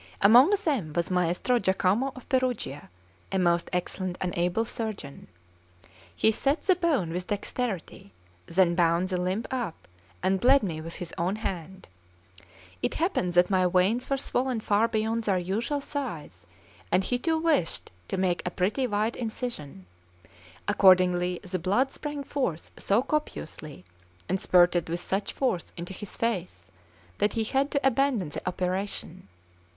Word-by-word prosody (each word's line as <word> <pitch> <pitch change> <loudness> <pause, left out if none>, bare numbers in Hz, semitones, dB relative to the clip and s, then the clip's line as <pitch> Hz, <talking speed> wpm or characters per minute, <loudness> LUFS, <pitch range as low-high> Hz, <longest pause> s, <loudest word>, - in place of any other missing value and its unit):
Among 240 - +7 0.2
them 225 - 0
was 170 +2 -1
Maestro 180 +7 +1
Jacomo 195 +7 +1
of 255 - -12
Perugia, 255 - -1 0.4
a 195 - 0
most 170 -2 +2
excellent 180 0 -2
and 180 -1 -2
able 180 +6 +1
surgeon. 215 -12 -5 0.9
He 220 - +4
set 275 +7 0
the 375 - +4
bone 300 - +1
with 180 +1 -4
dexterity, 205 - -3 0.4
then 175 0 +3
bound 170 +1 +2
the 180 -1 -1
limb 185 +5 -1
up, 240 -10 -4 0.4
and 190 +1 +2
bled 265 +2 +5
me 165 -5 -3
with 165 +1 -6
his 175 -2 -7
own 180 +4 0
hand. 190 -3 -5 0.9
It - - -1
happened 320 - 0
that 175 +2 +4
my 185 -1 +3
veins 190 +7 +2
were 275 - +1
swollen 255 -2 -1
far 215 +1 +2
beyond 225 0 -1
their 195 -3 +2
usual 215 +11 -1
size, 285 -1 -6 0.4
and 185 - +3
he 245 +5 -1
too 325 +4 +1
wished 315 - +1 0.2
to - - -3
make 185 -2 +1
a - - -1
pretty 200 +9 0
wide 215 +1 0
incision; 220 - -5 0.8
accordingly 180 -2 +4
the 185 -1 -3
blood 205 +10 +1
sprang 295 -1 -5
forth 255 - -2
so 205 +5 +2
copiously, 160 - -4 0.4
and 190 +1 -1
spurted 175 -2 +4
with 170 +1 -2
such 195 +3 -1
force 250 -10 -1
into 175 +2 -6
his 205 +1 -7
face, 180 - -3 0.5
that 205 - +2
he 225 - 0
had 270 +5 +1
to 280 -2 +1
abandon 265 - +1
the - - -5
operation. 185 - -3
195 Hz, 150 wpm, -27 LUFS, 180-245 Hz, 0.9 s, Among